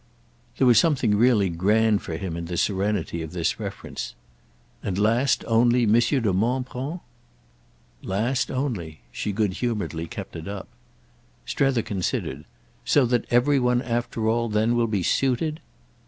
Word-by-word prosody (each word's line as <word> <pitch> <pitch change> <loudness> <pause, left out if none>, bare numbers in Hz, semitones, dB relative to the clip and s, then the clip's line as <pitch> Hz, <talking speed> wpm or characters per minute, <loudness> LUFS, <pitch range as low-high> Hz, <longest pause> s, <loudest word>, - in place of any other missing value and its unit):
There 135 - +3
was 120 -2 +7
something 135 -10 +2
really 110 -2 +4
grand 105 +5 +2
for 80 - -5
him 85 -1 -4
in 85 0 -4
the 85 +1 -4
serenity 95 -3 -1
of 80 +1 -7
this 85 -2 -1
reference. - - -6 0.7
"And 95 -2 -3
last 120 +4 +2
only 120 +1 +4
Monsieur 120 +6 +3
de 110 -6 +1
Montbron?" 130 - -2 1.0
"Last 115 +7 -1
only"—she 90 - -4
good 105 -2 0
humouredly 100 -8 -3
kept - - -8
it 80 +1 -7
up. 100 -1 -6 0.8
Strether 135 -5 +1
considered. 85 -7 -3 0.4
"So 140 - +3
that 120 -1 +1
every 135 +4 +3
one 125 0 +2
after 120 -2 -2
all 115 +1 +1
then 110 +3 +2
will 120 -1 +2
be 100 -4 -1
suited?" 135 - 0
115 Hz, 140 wpm, -24 LUFS, 95-125 Hz, 1.0 s, was